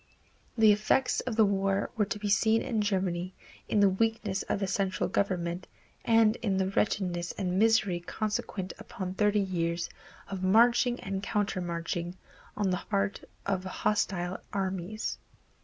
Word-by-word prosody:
The 220 -1 +7
effects 215 +5 +2
of 245 -3 -3
the 220 -1 +5
war 195 0 0
were 215 -2 +2
to 210 - -3
be 210 0 -4
seen 220 +2 +3
in 220 -3 0
Germany 185 -3 -1 0.3
in 210 - +3
the 200 - +6
weakness 215 -1 0
of - - 0
the 200 - 0
central 195 0 0
government 180 -2 -1 0.4
and 225 -1 +4
in 195 -5 -1
the 190 0 +1
wretchedness 180 -4 0
and 185 -1 -1
misery 215 -5 +3
consequent 210 0 -3
upon 185 -2 -5
thirty 210 +1 +2
years 170 -3 -1 0.4
of 195 -2 -5
marching 235 +5 +4
and 195 0 -3
countermarching 175 -4 -2 0.4
on 200 -3 +1
the 180 - -1
part 200 -1 -1 0.2
of 190 -2 -1
hostile 185 -2 -1
armies. 190 +1 -3
195 Hz, 145 wpm, -29 LUFS, 185-215 Hz, 0.4 s, The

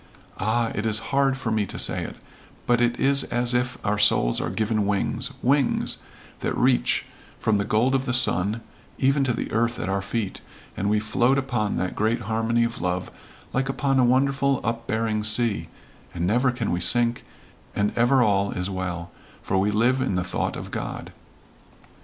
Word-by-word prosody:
Ah, 115 +3 0
it 100 - -2
is 110 -1 +1 0.2
hard 135 -1 +3
for 115 -4 -3
me 105 -2 0
to - - -6
say - - -1
it - - -7 0.5
but 120 -1 +2
it 120 0 +1
is 140 0 +3
as 120 0 0
if 125 0 0
our 105 0 0
souls - - +4
are - - -2
given 110 -2 0
wings 100 -1 -1
wings 135 0 +1 0.4
that - - -2
reach - - +2 0.3
from 105 -2 +1
the - - +1
gold 115 +6 +2
of 135 0 +1
the 125 - -1
sun 110 -2 +3 0.4
even 135 +1 +2
to 130 - +1
the 120 - -3
earth 120 +2 0
at 90 - -3
our 100 0 0
feet, 100 0 -3 0.3
and 100 - -1
we 105 0 +2
float 120 +5 +2
upon 120 -6 -1
that 90 +1 -2
great 110 +3 0
harmony 115 +1 0
of 115 0 -3
love 90 +1 -2 0.4
like 135 +1 0
upon 135 0 +1
a - - +5
wonderful 135 +2 +2
upbearing 115 -1 -1
sea, 110 0 +2 0.5
and 85 0 -1
never 120 +7 +2
can 120 -3 -3
we 85 - 0
sink, 120 -1 +2 0.5
and 105 0 0
ever 125 +2 +4
all 100 -2 +2
is 90 +1 -3
well 90 -2 -4 0.3
for 95 - 0
we 100 +2 +2
live 120 +5 +2
in 130 -8 0
the 90 - 0
thought - - -2
of - - -7
God." - - -5
115 Hz, 185 wpm, -24 LUFS, 100-125 Hz, 0.5 s, a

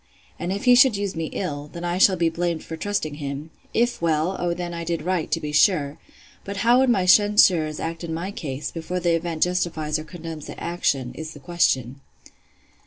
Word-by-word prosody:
And 175 - -3
if 200 +1 -3
he 250 - +7
should 245 -3 +6
use 200 -2 -3
me 165 -1 -2
ill, 150 -6 -4
then 170 - -8
I 175 +1 -1
shall 190 0 +6
be 170 -2 +1
blamed 170 0 -2
for 165 - -6
trusting 160 -3 -2
him: 145 +1 -6 0.2
If 240 -3 0
well, 165 +2 +1
O 175 -1 0
then 175 0 -5
I 170 0 -4
did 165 0 -2
right, 180 -2 -1
to 165 - 0
be 150 -2 -5
sure!—But 150 +4 -1
how 240 +2 +6
would 265 -1 +3
my 195 -6 +2
censurers 185 -6 +4
act 165 +1 -4
in 170 - -5
my 170 +4 -3
case, 145 -6 -5
before 175 +2 -4
the 175 -1 +1
event 165 -1 0
justifies 160 -4 -1
or - - -6
condemns 160 -2 -8
the - - -8
action, 135 -7 -1
is 155 +4 -7
the - - -10
question? 135 -5 0
170 Hz, 205 wpm, -23 LUFS, 155-185 Hz, 0.2 s, he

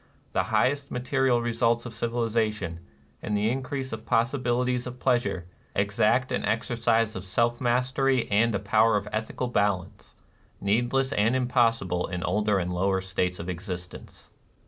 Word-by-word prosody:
The - - +1
highest 140 +1 +1
material 125 -1 +1
results 115 0 +1
of 120 - -7
civilization, 115 -6 -1 0.4
and 105 -1 -1
the 105 +2 +1
increase 130 0 -3
of 110 0 -6
possibilities 125 +1 0
of 125 0 -8
pleasure, 110 -9 0 0.3
exact 110 +5 +2
an - - -1
exercise 115 -1 +1
of 95 - -5
self 120 +5 0
mastery 130 +1 +1
and 110 +2 +3
a - - 0
power 110 +2 +3
of 100 +1 -4
ethical 110 +3 -2
balance, 100 -6 -1 0.4
needless 120 +6 +1
and 110 +5 +2
impossible 115 -8 +1
in 90 0 -4
older 105 +2 +1
and 90 -1 -2
lower 95 +2 +1
states 90 -1 -2
of 85 - -7
existence. 90 -1 -7
115 Hz, 145 wpm, -27 LUFS, 100-125 Hz, 0.4 s, and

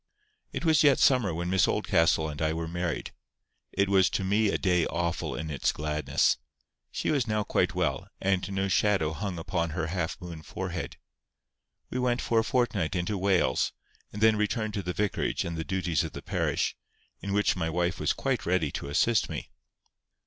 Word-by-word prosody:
It - - -4
was 160 -2 +5
yet 140 -3 +6
summer 125 -8 +4
when 85 +2 -3
Miss 95 -1 +4
Oldcastle 80 -1 +2
and 75 0 -6
I 80 0 +1
were 80 0 -3
married. 85 -1 -3 0.6
It 100 +1 +1
was 95 -1 +4
to - - -2
me 105 +3 +2
a - - +1
day 90 -3 +2
awful 85 0 -2
in 80 0 -4
its 70 - +1
gladness. 75 -2 +1 0.5
She - - -1
was 135 -6 +1
now 105 -1 0
quite - - 0
well, - - -1
and 95 0 0
no 95 0 0
shadow 95 -5 +2
hung 95 +1 -4
upon 85 0 -1
her 85 - 0
half 90 -1 -2
moon 85 -4 -8
forehead. - - -5 0.9
We 125 - -2
went 125 -1 +1
for 115 - +2
a - - +2
fortnight 110 - 0
into 90 +4 -1
Wales, 95 -9 +2 0.4
and 105 +1 -4
then 110 -1 +5
returned 105 +1 -1
to 100 - -2
the 90 -1 -3
vicarage 105 +1 -1
and 85 0 -3
the 80 - -3
duties 90 -4 0
of - - -6
the - - -8
parish, - - 0 0.4
in 100 - -5
which 105 +1 +2
my 80 -3 -1
wife 85 +2 -1
was - - +1
quite - - -1
ready 85 -5 +1
to 70 - -5
assist 105 +9 +2
me. - - -6
95 Hz, 190 wpm, -28 LUFS, 80-105 Hz, 0.9 s, yet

